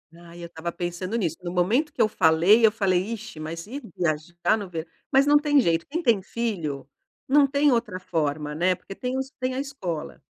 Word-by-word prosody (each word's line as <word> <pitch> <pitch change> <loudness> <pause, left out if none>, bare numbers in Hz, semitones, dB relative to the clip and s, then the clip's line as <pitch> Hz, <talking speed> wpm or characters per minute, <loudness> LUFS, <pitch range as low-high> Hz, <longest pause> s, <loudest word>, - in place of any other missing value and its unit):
Ai, 170 0 -13
eu 170 - -6
estava 170 0 -5
pensando 175 +5 -4
nisso. 170 -6 -1
No 175 - -4
momento 230 - +1
que - - -1
eu 215 - +5
falei, 175 +7 +5
eu 215 - +5
falei: 195 -5 +1
"Ixi, 225 -7 -8
mas 165 +4 -6
ir 280 +5 -6
viajar 170 +5 0
no 200 -3 -6
ver", 165 -1 -5 0.3
mas 270 +1 +6
não 295 0 +7
tem 290 -1 +3
jeito, 165 -5 +1
quem 335 +4 -3
tem 225 - +3
filho 170 - -4 0.4
não 285 +1 +5
tem 280 +1 +3
outra 230 -6 -1
forma, 150 -4 -2
né, 180 +3 +2
porque 190 +2 -10
tem 250 +1 -3
os 265 +1 -4
tem 255 0 -1
a 260 - -3
escola. 190 - -5
185 Hz, 210 wpm, -25 LUFS, 170-250 Hz, 0.4 s, não